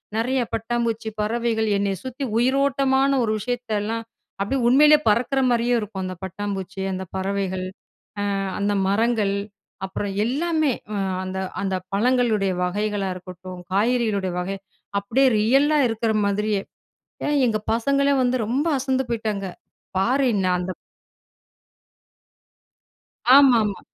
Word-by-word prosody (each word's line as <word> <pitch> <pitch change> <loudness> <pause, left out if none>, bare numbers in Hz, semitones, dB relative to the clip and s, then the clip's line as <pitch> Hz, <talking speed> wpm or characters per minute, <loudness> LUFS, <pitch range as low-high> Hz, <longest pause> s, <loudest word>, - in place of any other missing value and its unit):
நெறைய 250 +4 +1
பட்டாம்பூச்சி, 230 0 -1
பறவைகள் 225 0 0
என்னைய 200 -1 -1
சுத்தி 260 +2 -5
உயிரோட்டமான 270 +2 +2
ஒரு 220 - 0
விஷயத்தெல்லாம் 225 -1 -2 0.4
அப்படியே 250 +7 0
உண்மையிலேயே 300 +4 +6
பறக்குற 250 +5 +2
மாரியே 240 0 +2
இருக்கும். 205 -3 -5
அந்த 185 0 -5
பட்டாம்பூச்சி 190 0 -5
அந்த 185 0 -4
பறவைகள் 190 -1 -2 0.7
அ - - -1 0.2
அந்த 205 0 +1
மரங்கள் 215 0 +1 0.5
அப்புறம் 195 +1 -4
எல்லாமே 310 +2 +1 0.5
அந்த 190 0 -4 0.2
அந்த 190 -1 -1 0.2
பழங்களுடைய 220 -2 +2
வகைகளா 205 +1 -1
இருக்கட்டும் 180 0 -9
காய்கறிகளுடைய 210 -3 +1
வகை, 190 +2 -3 0.4
அப்படியே 245 +7 +2
ரியல் 270 +7 +4
லா 305 - +3
இருக்குற 225 0 -1
மாதிரியே. 205 0 0 0.7
ஏன் 295 -1 +2
எங்க 215 -2 0
பசங்களே 280 +4 +2
வந்து 250 0 +2
ரொம்ப 265 +7 0
அசந்து 265 0 0
போயிட்டாங்க. 215 -4 -2 0.5
பாரு 255 +8 +2
என்ன 195 -2 0
அந்த 180 +1 -3 2.6
ஆமாமா. 235 -8 +4
220 Hz, 115 wpm, -23 LUFS, 195-255 Hz, 2.6 s, உண்மையிலேயே